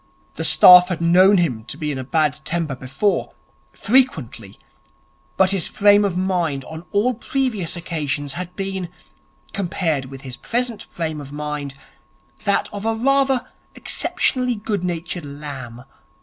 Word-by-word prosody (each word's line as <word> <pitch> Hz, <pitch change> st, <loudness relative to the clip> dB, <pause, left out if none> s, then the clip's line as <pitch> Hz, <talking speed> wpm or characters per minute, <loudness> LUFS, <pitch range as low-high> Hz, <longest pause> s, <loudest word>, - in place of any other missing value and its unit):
The -, -, -5 dB
staff 180 Hz, 0 st, +8 dB
had 180 Hz, -3 st, -3 dB
known 185 Hz, +4 st, +5 dB
him 130 Hz, -11 st, 0 dB
to 120 Hz, +5 st, -7 dB
be 150 Hz, -2 st, -3 dB
in 135 Hz, -, -4 dB
a -, -, -4 dB
bad 150 Hz, +1 st, 0 dB
temper 165 Hz, -4 st, -2 dB
before 135 Hz, +10 st, -2 dB, 0.4 s
frequently; 155 Hz, -, 0 dB, 0.8 s
but 190 Hz, 0 st, +4 dB
his 195 Hz, -5 st, 0 dB
frame 205 Hz, 0 st, +4 dB
of 190 Hz, -3 st, -1 dB
mind 175 Hz, -8 st, -1 dB
on 160 Hz, +2 st, -9 dB
all 220 Hz, +5 st, +1 dB
previous 235 Hz, -7 st, -2 dB
occasions 150 Hz, -5 st, -3 dB
had 180 Hz, 0 st, -6 dB
been, 190 Hz, -2 st, -4 dB, 0.6 s
compared 170 Hz, -7 st, -1 dB
with 135 Hz, 0 st, -10 dB
his 130 Hz, -3 st, -9 dB
present 240 Hz, -2 st, -2 dB
frame 160 Hz, -3 st, -5 dB
of 140 Hz, -1 st, -11 dB
mind, 150 Hz, -2 st, -5 dB, 0.7 s
that 200 Hz, -, +2 dB
of 205 Hz, 0 st, -6 dB
a 225 Hz, 0 st, 0 dB
rather 270 Hz, +1 st, +2 dB, 0.3 s
exceptionally 250 Hz, -2 st, 0 dB
good 205 Hz, -3 st, -3 dB
natured 175 Hz, 0 st, -3 dB
lamb. 140 Hz, -4 st, -8 dB
175 Hz, 145 wpm, -21 LUFS, 145-200 Hz, 0.8 s, staff